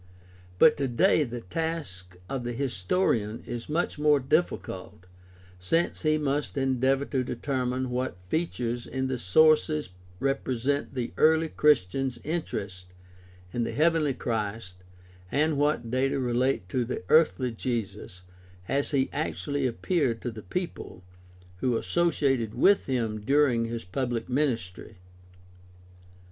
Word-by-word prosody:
But - - +6
today 145 +5 +3
the 120 -3 -5
task 105 - -4
of 130 +3 -3
the 120 0 -3
historian 115 - 0
is 120 +2 -6
much 160 -1 -1
more 150 -1 +4
difficult 130 - -2 0.5
since 165 - 0
he 155 -1 +2
must 145 0 -2
endeavor 135 +1 +1
to 130 -3 -1
determine 125 0 -2
what 125 -6 -2
features 120 - -2
in 130 0 -2
the 130 -2 -2
sources 155 - +3 0.3
represent 135 0 -1
the 120 -2 -3
early 160 +1 +4
Christians' 135 -3 +2
interest 100 - -4 0.7
in 120 - 0
the - - -3
heavenly 155 -3 +2
Christ 110 -5 -3 0.6
and 150 +3 +2
what 140 -5 0
data 135 +2 +1
relate 125 -5 0
to 125 +5 0
the 120 -5 -4
earthly 145 - +4
Jesus 105 -6 -4 0.4
as 140 +1 0
he 135 -2 +1
actually 145 -2 -1
appeared 125 -1 0
to 120 - -2
the 110 -1 -9
people 105 - -5 0.5
who 120 +4 +1
assoc^'ated 135 -10 +1
with 195 +11 +4
him 115 -5 -1
during 135 -3 +3
his 115 -3 -5
pubhc 120 +3 -2
ministry. 120 -8 -2
130 Hz, 125 wpm, -27 LUFS, 115-150 Hz, 0.7 s, But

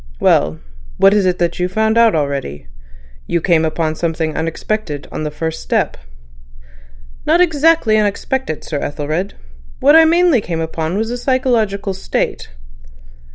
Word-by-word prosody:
"Well! 75 +1 +2 0.4
What 195 +1 +5
is 205 -3 +2
it 180 0 +1
that 175 0 -1
you've 180 +1 -2
found 220 +1 +1
out 230 -4 +4
already? 140 - -3 0.6
You 170 - 0
came 165 -1 +2
upon 160 0 -1
something 160 -1 -2
unexpected 160 -1 -3
on - - -5
the - - -1
first 160 +2 -4
step." - - -1 1.3
"Not 325 +3 +4
exactly 320 -8 +3
unexpected, 210 - -2
Sir 150 - -4
Ethelred. 155 +7 -3 0.4
What 290 +3 +5
I 325 0 +8
mainly 335 -6 +3
came 170 -4 -4
upon 160 +2 -3
was 225 +2 -2
a 245 - -4
psychological 230 -7 0
state." 190 - -3
185 Hz, 145 wpm, -17 LUFS, 160-235 Hz, 1.3 s, I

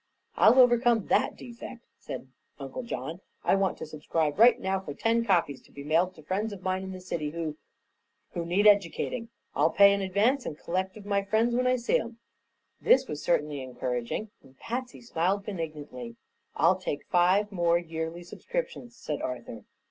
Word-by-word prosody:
"I'll 255 - +6
overcome 240 -3 +5
that - - +2
defect," 240 0 -10
said - - -7 0.3
Uncle 135 - -6
John. 170 - -5 0.2
"I - - +3
want 195 -1 +1
to - - -6
subscribe 155 +1 -2
right 240 +2 +7
now 190 0 -1
for 145 -7 -8
ten 230 +5 +1
copies, 170 - +1
to - - -23
be 140 - -9
mailed 170 +5 +1
to 155 - -14
friends 200 +7 -2
of 195 -2 -9
mine 185 0 -1
in 190 0 -6
the 185 - -7
city 170 -4 -3
who 160 -1 -4 0.8
who 170 - -3
need 180 +5 +1
educating. 205 +3 +3 0.2
I'll - - +3
pay 200 0 +6
in 200 - -1
advance 210 +8 +2
and 150 - -5
collect 185 +4 -3
of 205 - -12
my 200 -1 +1
friends 220 +4 +1
when 250 +1 +2
I 255 - +4
see 240 -1 +1
'em." 230 0 -7 0.6
This 265 0 +4
was 150 - -5
certainly 150 -4 0
encouraging 125 - -3
and 135 -1 -20
Patsy 245 +2 -5
smiled 195 -2 -1
benignantly. 150 - -6 0.4
"I'll - - +4
take 145 - -4
five 185 +4 +3
more 170 -3 +2
yearly 165 0 -5
subscriptions," 475 - -5
said 150 -9 -4
Arthur. 125 -2 -6
185 Hz, 180 wpm, -28 LUFS, 155-225 Hz, 0.8 s, right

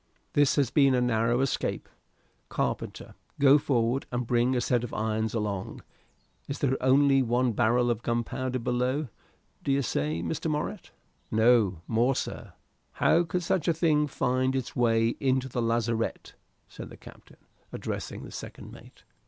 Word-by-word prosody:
"This 145 -1 +3
has 140 -4 +1
been 140 -3 +4
a - - +2
narrow 120 0 +1
escape. 135 - -2 0.6
Carpenter, - - -3 0.3
go 140 +1 +6
forward 125 -1 0
and 125 0 -2
bring 120 +2 +2
a - - +2
set 120 -1 +1
of 120 - -6
irons 110 +1 -1
along. 100 -3 -3 0.6
Is 140 - -4
there 135 -2 +1
only 135 +1 +4
one 125 0 +1
barrel 120 +2 +2
of 115 -1 -2
gunpowder 120 +2 -2
below, 125 +4 -1 0.5
d'ye 140 0 +1
say, 80 - -2
Mr. 85 - -2
Morritt?" 160 +4 -3 0.4
"No 110 -6 +3
more, 120 +4 +2
sir." - - -5 0.4
"How 170 - +3
could 175 +2 -2
such 170 0 0
a 170 - +3
thing 150 -2 +2
find 130 -1 0
its 130 -2 -3
way 115 -2 +3
into 130 -1 +1
the 120 -1 -3
lazarette?" 115 0 -1 0.3
said - - -10
the - - -12
captain, - - -15 0.3
addressing - - -5
the - - -10
second - - -9
mate. - - -15
125 Hz, 155 wpm, -28 LUFS, 115-135 Hz, 0.6 s, go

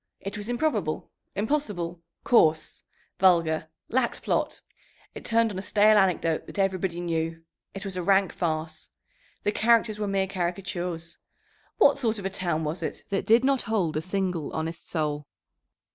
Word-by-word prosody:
It 195 - -6
was 210 +2 -6
improbable, 300 +6 -1 0.2
impossible, 200 - -1 0.2
coarse, 160 -10 +3 0.4
vulgar; 165 -4 +3 0.2
lacked 245 -1 0
plot. - - 0 0.5
It - - -9
turned 230 -1 +2
on 190 - -4
a - - -3
stale 210 +2 +4
anecdote 180 -5 +2
that - - -9
everybody 190 -3 0
knew. 165 -1 -2 0.3
It 195 +2 -6
was 195 -1 -5
a 180 - -2
rank 195 +1 +3
farce. 160 -1 -3 0.5
The 205 - +2
characters 220 -1 +3
were 210 - -1
mere 195 -1 +1
caricatures. 175 -2 -4 0.6
"What 285 -9 +5
sort 225 -4 0
of 200 - -6
a 195 - -1
town 175 -4 -1
was 160 +3 -3
it 160 - -4
that 195 - -1
did 230 +3 +6
not 270 -1 +3
hold 185 -9 +1
a 155 - 0
single 185 -3 -2
honest 160 +1 -4
soul?" 150 -3 -2
190 Hz, 160 wpm, -27 LUFS, 165-210 Hz, 0.6 s, did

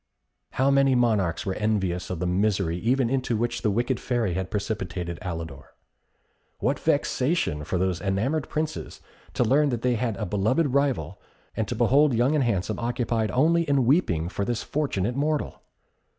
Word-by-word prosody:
How 135 +2 +2
many 135 -1 +4
monarchs 110 -9 +1
were 95 - -1
envious 95 -4 -1
of 90 - -3
the 90 - -2
misery 95 -1 +1
even 125 +4 +1
into 125 -2 0
which 120 +2 -2
the 110 - +1
wicked 120 +4 0
Fairy 120 -7 -1
had 95 +1 -3
precipitated 95 -5 -3
Alidor? 80 -6 -7 0.8
What 135 +7 0
vexation 145 - 0
for 90 - -2
these 90 -2 0
enamoured 110 - -1
princes 155 0 -4 0.3
to - - +3
learn 140 +5 +3
that 120 -3 -3
they 125 -1 +2
had 115 -3 -1
a - - -3
beloved 120 - +1
rival, 100 - 0 0.3
and 110 - -1
to - - -3
behold 130 +4 +4
Young 125 +5 +2
and 150 -3 +2
Handsome 110 -3 -1
occupied 120 -2 -1
only 165 +6 +3
in 140 -3 +3
weeping 105 - +2
for 100 +2 -3
this 115 +2 -2
fortunate 125 -7 -1
mortal! 150 +1 -1
115 Hz, 165 wpm, -25 LUFS, 95-135 Hz, 0.8 s, many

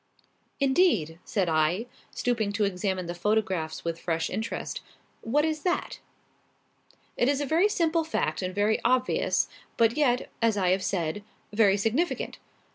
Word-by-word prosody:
"Indeed!" 265 - +2
said 195 -5 0
I, 160 +6 +1 0.2
stooping 230 -4 -1
to 210 0 +1
examine 190 -1 -1
the 170 - -4
photographs 185 -5 -1
with 165 0 -2
fresh 165 -1 -1
interest; 220 +4 -4 0.4
"what 290 +7 +1
is 310 -1 -1
that?" 355 +2 -1 1.2
"It 245 - +2
is 285 -1 +1
a 290 - -1
very 335 +9 +3
simple 330 -4 +1
fact 195 - -1
and 185 0 -3
very 210 +2 +2
obvious, 255 +1 +2 0.3
but 230 +1 +4
yet, 255 -5 +2
as 225 -2 +3
I 185 -2 +2
have 190 +1 +2
said, 180 +1 -2 0.3
very 205 -2 +4
significant. 235 - -1
215 Hz, 145 wpm, -27 LUFS, 185-265 Hz, 1.2 s, but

